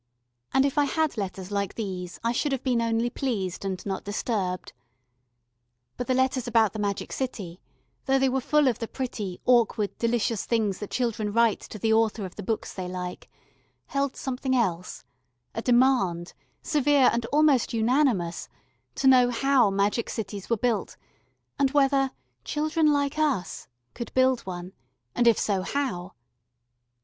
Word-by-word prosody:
And 265 - +4
if 280 +1 +1
I 290 - +4
had 315 +2 0
letters 190 -2 -5
like 200 -1 -2
these 185 -5 -5
I 230 - +1
should 285 +4 0
have 260 - -3
been 245 -3 +1
only 230 +1 0
pleased 200 -11 -3
and 190 -2 -4
not 195 -2 -3
disturbed. 200 -3 -2 1.2
But 245 - -4
the 255 - +2
letters 260 -1 +1
about 225 -3 +3
the 215 - -5
Magic 200 -1 -2
City, 195 -9 -5 0.4
though 270 0 +3
they 270 0 +3
were 265 0 0
full 300 +2 +3
of 245 - +1
the 230 - -3
pretty, 215 -9 -5
awkward, 230 -4 +2
delicious 230 -2 0
things 215 -5 0
that 210 - -6
children 225 -4 -1
write 230 0 +3
to - - -9
the 220 +2 +1
author 220 -2 +1
of 185 - -8
the - - -6
books 220 +3 -3
they 185 -2 -5
like, 180 0 -6 0.6
held 275 -1 -1
something 260 0 -2
else 180 - -1 0.5
a 225 - -3
demand, 240 -9 +2 0.3
severe 290 -3 +4
and 235 -1 -1
almost 290 -2 +3
unanimous, 225 - +1 0.5
to - - -3
know 250 -2 +6
how 250 -1 +3
magic 200 +4 0
cities 205 -3 -5
were 230 - +2
built, 235 0 -1 0.6
and 275 -1 +4
whether 275 -1 +3 0.3
"children 310 - +1
like 285 +1 0
us" 270 - -1 0.3
could 235 - -6
build 260 -1 +4
one, 180 0 -6 0.4
and, 240 - +2
if 230 - +6
so, 195 -3 0
how? 190 -7 -3
230 Hz, 160 wpm, -26 LUFS, 200-265 Hz, 1.2 s, know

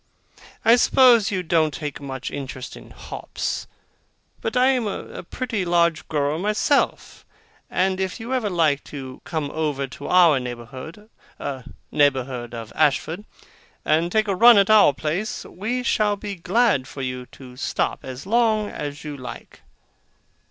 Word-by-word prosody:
I 230 +2 +7
suppose 245 -4 +5
you 185 -3 -2
don't 160 -2 +2
take 145 0 -5
much 135 -2 -5
interest 130 -2 -6
in - - -13
hops; - - -5 0.7
but - - -2
I 255 +1 +5
am 250 -4 0
a 200 - -6
pretty 225 +1 -3
large 170 -2 +2
grower 150 +1 0
myself; 210 +8 0 0.5
and 185 0 +1
if 190 +4 -2
you 235 +3 -4
ever 245 -5 0
like 160 -6 +2
to 130 -3 -8
come 155 -4 -3
over 150 -3 -1
to 135 - -9
our 170 -6 +5
neighbourhood 130 - -8 0.8
neighbourhood 130 -4 +1
of 115 -2 -8
Ashford 155 +6 +1 0.6
and 165 +3 +2
take 215 +1 +2
a 200 - +1
run 235 +4 +8
about 200 +2 +5
our - - +5
place, 165 +9 -3
we 235 +7 -3
shall 210 -3 +2
be 205 0 -6
glad 190 - +1
for 135 - -7
you 125 -1 -4
to 125 -2 -12
stop 130 - -1
as 130 +3 -8
long 215 -1 +2
as 145 0 -6
you 150 -1 -6
like. 125 -2 -10
165 Hz, 150 wpm, -23 LUFS, 140-210 Hz, 0.8 s, run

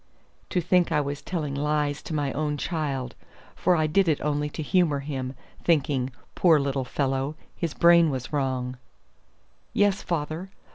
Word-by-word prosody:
To 180 - +1
think 175 0 +2
I 150 - +3
was 145 0 -3
telling 155 -6 -3
lies 145 0 0
to - - -7
my 145 -2 0
own 150 0 -1
child! 140 -6 -2 0.4
for 180 - +3
I 155 -2 +2
did 180 +5 +3
it 155 -3 +2
only 150 0 0
to 155 - -5
humor 155 -3 +2
him, 135 -2 -4 0.3
thinking, 140 -5 +2 0.2
poor 165 -4 +5
little 135 -2 -1
fellow, 135 +2 -1 0.2
his 165 -3 -3
brain 170 -1 +6
was 130 -1 -4
wrong. 130 -3 -1 0.9
"Yes, 205 -1 +3
father. 165 +2 -3
150 Hz, 155 wpm, -26 LUFS, 140-165 Hz, 0.9 s, brain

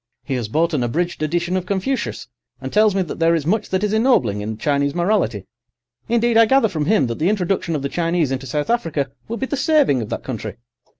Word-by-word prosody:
He 140 - -4
has 120 -4 -2
bought 165 +8 0
an 145 - +1
abridged 165 +10 -1
edition 175 +3 -1
of 185 -1 -2
Confucius, 230 +6 -2 0.3
and - - -7
tells 215 -1 +4
me 190 - +2
that 170 - -7
there 165 0 +4
is 155 -3 -2
much 210 +5 0
that 190 +1 0
is 210 0 0
ennobling 220 - +2
in 110 +1 -4
Chinese 140 +2 0
morality. 175 - 0 0.6
Indeed, 235 0 +2
I 230 -1 +6
gather 265 -2 +4
from 155 -6 -2
him 190 -5 +3
that 115 -1 -4
the 165 +4 +2
introduction 185 -4 0
of 140 - -3
the - - 0
Chinese 165 -2 0
into 135 0 -3
South 150 - -1
Africa 155 - -1 0.2
will 230 - -4
be 265 - -2
the 285 - -3
saving 285 - +3
of 110 - -6
that - - -4
country. 110 -5 -5
170 Hz, 230 wpm, -20 LUFS, 140-215 Hz, 0.6 s, I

